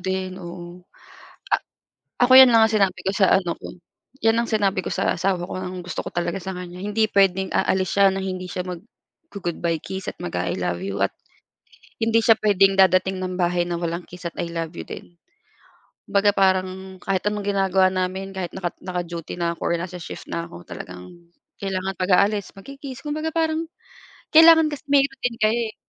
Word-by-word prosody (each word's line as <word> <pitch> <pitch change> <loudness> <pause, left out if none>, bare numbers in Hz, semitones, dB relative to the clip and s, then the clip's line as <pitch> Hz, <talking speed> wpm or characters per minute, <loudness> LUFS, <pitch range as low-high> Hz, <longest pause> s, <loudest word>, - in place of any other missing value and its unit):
din, 190 0 -3
oo. 175 0 -9 1.4
A 245 - +5
ako, - - +4
'yan 260 -2 +10
lang 225 -1 +6
ang - - -5
sinabi 195 -3 +1
ko 195 - -1
sa 195 - +4
ano 175 -3 +1
ko, - - -10 0.5
'yan 225 0 +3
ang 235 - +2
sinabi 200 -4 +1
ko - - -3
sa - - 0
asawa 185 0 0
ko, - - -5
nang 185 0 -5
gusto 180 0 -5
ko - - -7
talaga 175 +2 -2
sa 190 0 -5
kaniya, 180 0 -8
hindi 215 +1 +1
puwedeng 190 -2 +2
aalis 185 0 0
siya 195 -1 +5
na 195 - -3
hindi 185 -1 -4
siya 180 0 -5
maggo-goodbye 175 - -5
kiss 190 0 -5
at - - -30
mag-a-I 90 +1 -3
love 90 0 -2
you 100 0 -4
at 100 - 0 0.9
hindi 225 0 +2
siya 225 - +8
puwedeng 195 -2 +4
dadating 190 0 +3
ng 185 0 -3
bahay 175 -1 0
na 170 - -1
walang 170 0 -3
kiss 180 0 -12
at 170 - -3
I 170 - -4
love 165 -1 -4
you - - -6
din. - - -10 0.9
Kumbaga 200 +1 +3
parang 190 -1 0
kahit 195 0 -1
anong 210 -1 -1
ginagawa 190 -1 +3
namin 185 +1 -3
kahit 180 -2 -4
naka 185 -2 -3
naka-duty 175 -3 -5
na 170 -1 -2
ako - - -1
nasa 185 0 -6
shift 175 - -9
na 170 0 -3
ako, 85 - -11
talagang 90 +1 -9 0.5
kailangan 190 -1 -3
pag-aalis 200 +2 +2
magki-kiss 270 +4 -10
kumbaga 310 +2 -3
parang 320 0 0 0.7
kailangan 320 -1 +7
kasi 290 -1 -8
may 280 -1 +5
routine 265 -3 -3
kayo, 215 +2 +2
eh. 215 - -10
190 Hz, 185 wpm, -23 LUFS, 175-205 Hz, 1.4 s, yan